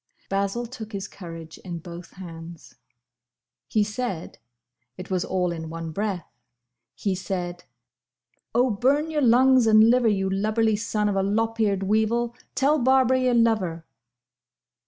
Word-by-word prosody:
Basil 200 Hz, +4 st, -1 dB
took 225 Hz, -2 st, -9 dB
his 195 Hz, 0 st, -4 dB
courage 165 Hz, -3 st, -10 dB
in 175 Hz, -2 st, -6 dB
both 170 Hz, +1 st, -10 dB
hands. 170 Hz, -2 st, -10 dB, 0.9 s
"He 215 Hz, +8 st, +2 dB
said—it 125 Hz, -, -8 dB
was 180 Hz, -2 st, +1 dB
all 180 Hz, -2 st, -1 dB
in 160 Hz, -1 st, -6 dB
one 165 Hz, 0 st, -6 dB
breath—He 125 Hz, -, -6 dB
said, 180 Hz, -1 st, -4 dB, 0.9 s
'O 245 Hz, +1 st, +3 dB
burn 280 Hz, +9 st, +1 dB
your 300 Hz, -1 st, 0 dB
lungs 255 Hz, 0 st, +5 dB
and 220 Hz, +1 st, +7 dB
liver 245 Hz, -1 st, +3 dB
you 195 Hz, -3 st, +1 dB
lubberly 215 Hz, +3 st, +1 dB
son 210 Hz, 0 st, -1 dB
of 205 Hz, -, 0 dB
a 195 Hz, -, +2 dB
lop 225 Hz, +3 st, 0 dB
eared 200 Hz, -3 st, +1 dB
weevil 220 Hz, +4 st, +1 dB, 0.2 s
tell 290 Hz, +3 st, +3 dB
Barbara 260 Hz, 0 st, +4 dB
you 255 Hz, -1 st, +2 dB
love 230 Hz, -1 st, +4 dB
her! 165 Hz, -3 st, -5 dB
200 Hz, 135 wpm, -25 LUFS, 170-230 Hz, 0.9 s, and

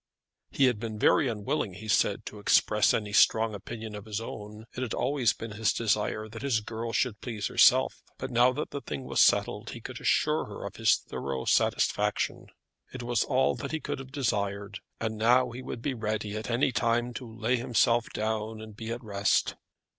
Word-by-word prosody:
He 135 Hz, -, +3 dB
had 125 Hz, -5 st, +2 dB
been 110 Hz, -1 st, -5 dB
very 135 Hz, +6 st, +4 dB
unwilling, 110 Hz, -, -2 dB
he 110 Hz, +3 st, -9 dB
said, 105 Hz, -, +2 dB
to 105 Hz, -, -8 dB
express 105 Hz, +1 st, +4 dB
any 105 Hz, -2 st, -2 dB
strong 110 Hz, +1 st, +4 dB
opinion 110 Hz, +2 st, -7 dB
of 105 Hz, 0 st, -8 dB
his 110 Hz, -1 st, -3 dB
own. 105 Hz, -1 st, -8 dB
It 125 Hz, -, -4 dB
had 125 Hz, -4 st, -2 dB
always 130 Hz, -4 st, +2 dB
been 115 Hz, -1 st, -7 dB
his 105 Hz, +1 st, +1 dB
desire 110 Hz, -1 st, 0 dB
that 110 Hz, +1 st, -9 dB
his 120 Hz, -5 st, +1 dB
girl 115 Hz, +2 st, -5 dB
should 110 Hz, -3 st, 0 dB
please 110 Hz, -5 st, -4 dB
herself. 65 Hz, -2 st, +4 dB, 0.2 s
But 130 Hz, -, -5 dB
now 120 Hz, +1 st, +5 dB
that 150 Hz, +4 st, -4 dB
the 140 Hz, -, -4 dB
thing 70 Hz, -, -5 dB
was 65 Hz, 0 st, +1 dB
settled -, -, +3 dB
he -, -, -7 dB
could -, -, -8 dB
assure -, -, +2 dB
her -, -, -8 dB
of -, -, -7 dB
his -, -, +4 dB
thorough 65 Hz, -1 st, -5 dB
satisfaction. -, -, +1 dB, 0.4 s
It 130 Hz, -2 st, -7 dB
was 120 Hz, -1 st, +1 dB
all 130 Hz, -1 st, +2 dB
that 140 Hz, -, -5 dB
he 160 Hz, -, 0 dB
could 140 Hz, -, -4 dB
have 135 Hz, -1 st, -9 dB
desired; 100 Hz, -6 st, -2 dB, 0.2 s
and 110 Hz, -1 st, -3 dB
now 125 Hz, +2 st, +4 dB
he 125 Hz, +2 st, -7 dB
would 120 Hz, -2 st, -7 dB
be 140 Hz, -, -1 dB
ready 110 Hz, -2 st, -3 dB
at 110 Hz, +2 st, -5 dB
any 130 Hz, +4 st, +2 dB
time 120 Hz, 0 st, 0 dB
to 115 Hz, -3 st, -9 dB
lay 120 Hz, +3 st, +2 dB
himself 120 Hz, -1 st, +2 dB
down, 110 Hz, 0 st, -2 dB
and 110 Hz, -1 st, -10 dB
be 110 Hz, +1 st, -7 dB
at 120 Hz, +2 st, -4 dB
rest. 100 Hz, -2 st, +1 dB
110 Hz, 200 wpm, -28 LUFS, 105-125 Hz, 0.4 s, now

